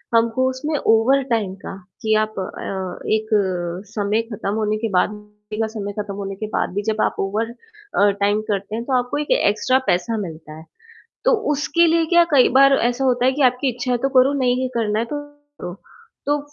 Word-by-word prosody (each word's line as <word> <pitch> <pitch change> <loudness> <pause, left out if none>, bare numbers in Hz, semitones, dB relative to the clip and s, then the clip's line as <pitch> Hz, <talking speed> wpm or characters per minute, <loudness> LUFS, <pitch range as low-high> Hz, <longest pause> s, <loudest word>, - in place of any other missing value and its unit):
हमको 230 +3 +2
उसमें 285 +4 -3
ओवरटाइम 230 -3 +2
का - - -6 0.3
कि 220 0 +1
आप 215 -2 -6
अ, 190 0 -5
एक 220 0 -1 0.7
समय 210 +1 +1
ख़त्म 200 -1 -3
होने 215 -1 0
के 225 0 -2
बाद 180 - +3
ड्यूटी 210 +1 -8
का 220 - +1
समय 205 -1 -4
ख़त्म 205 -1 -4
होने 195 -1 -5
के 215 +2 -5
बाद - - 0
भी 205 - -1
जब 215 - -2
आप - - +1
ओवर 215 +4 -1
अ, 420 - -1
टाइम 205 +1 +2
करते 200 +1 -3
हैं 235 - -3
तो 270 - -2
आपको 245 +3 -1
एक 295 - -3
एक्स्ट्रा 255 +5 +2
पैसा 180 +6 +1
मिलता 155 -1 -10
है। 160 - -12 0.6
तो - - +4 0.2
उसके 300 +4 +2
लिए 330 0 +3
क्या 345 0 +7
कई 265 -3 +6
बार 275 0 +7
ऐसा 245 +3 0
होता 250 -1 +2
है 260 - +4
कि 280 +1 -1
आपकी 250 +2 -2
इच्छा 250 +1 -3
है 245 - +1
तो 270 +3 0
करो, 260 +2 +5
नहीं 255 -2 +1
करना 215 -2 0
है 225 - +1
तो 265 +5 -5
मत 290 - -22 0.2
करो। 175 0 -5 0.5
तो 290 +1 +2
225 Hz, 205 wpm, -21 LUFS, 210-260 Hz, 0.7 s, क्या